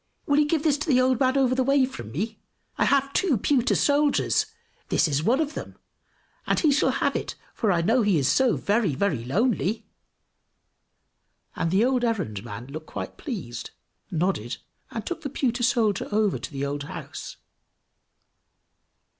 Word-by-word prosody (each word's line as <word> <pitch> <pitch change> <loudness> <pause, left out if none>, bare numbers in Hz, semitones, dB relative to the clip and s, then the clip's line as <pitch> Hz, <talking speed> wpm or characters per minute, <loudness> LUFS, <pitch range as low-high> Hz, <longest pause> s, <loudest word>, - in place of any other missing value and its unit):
will 285 0 +3
you 300 - +3
give 310 -1 0
this 295 -3 +2
to 300 - -4
the 260 -4 +4
old 255 -1 +3
man 260 0 +2
over 260 -2 +3
the 260 0 +2
way 275 0 +4
from 180 - -8
me? 215 - -3 0.4
I - - +2
have 275 0 +2
two 330 -11 +2
pewter 255 +4 +2
soldiers 295 +8 +2 0.4
this - - +3
is 145 -1 0
one 235 - +2
of 310 -1 -1
them, - - -7 0.7
and - - +2
he 310 - +3
shall 285 - +3
have - - 0
it, - - -3 0.2
for 215 -4 +1
I 170 -2 +1
know 230 +7 +3
he 205 -5 +3
is 135 -3 +1
so 235 - +3
very, 205 - +1
very 150 - 0
lonely." 215 - 0 1.7
And 165 - -1
the 195 +6 +3
old 255 -1 +1
errand 185 - -1
man 105 +4 -7
looked 155 +3 -8
quite - - -6
pleased, 180 - -5 0.4
nodded, 165 - -1 0.3
and 225 - -5
took 345 -2 -4
the 285 - -4
pewter 250 -3 -1
soldier 230 -4 +1
over 210 -2 +1
to - - -7
the 140 -1 -3
old 145 +1 -3
house. - - -8
230 Hz, 175 wpm, -25 LUFS, 170-275 Hz, 1.7 s, the